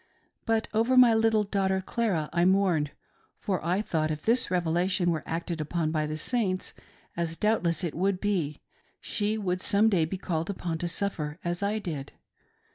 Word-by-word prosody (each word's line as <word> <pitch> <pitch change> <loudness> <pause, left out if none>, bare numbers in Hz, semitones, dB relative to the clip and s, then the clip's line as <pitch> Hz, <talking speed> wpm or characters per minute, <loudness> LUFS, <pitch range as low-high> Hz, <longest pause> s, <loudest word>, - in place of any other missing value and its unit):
But 225 -1 +1
over 230 +4 +2
my 245 -2 +8
little 220 -1 +3
daughter 195 -2 0
Clara 190 -6 -1
I 170 0 +2
mourned, 185 -5 +3 0.5
for 185 -5 -2
I 180 +5 0
thought 155 -6 0
if 150 -1 -4
this 230 +2 +2
revelation 175 +1 +1
were 160 -2 -1
acted 165 0 -3
upon 155 +1 -1
by 155 -1 0
the 155 +1 -4
Saints, 190 -2 -1 0.4
as 165 -1 -2
doubtless 195 -5 +1
it 170 - -2
would 190 +2 0
be, 175 -8 -1 0.4
she 215 0 -1
would 185 -3 -2
some 210 +2 +4
day 175 -6 +2
be 185 +4 -4
called 165 -2 -3
upon 175 -4 -3
to 175 - -2
suffer 165 -4 -2
as 175 +1 -2
I 205 +2 0
did. 155 -9 -5
180 Hz, 175 wpm, -28 LUFS, 165-205 Hz, 0.5 s, my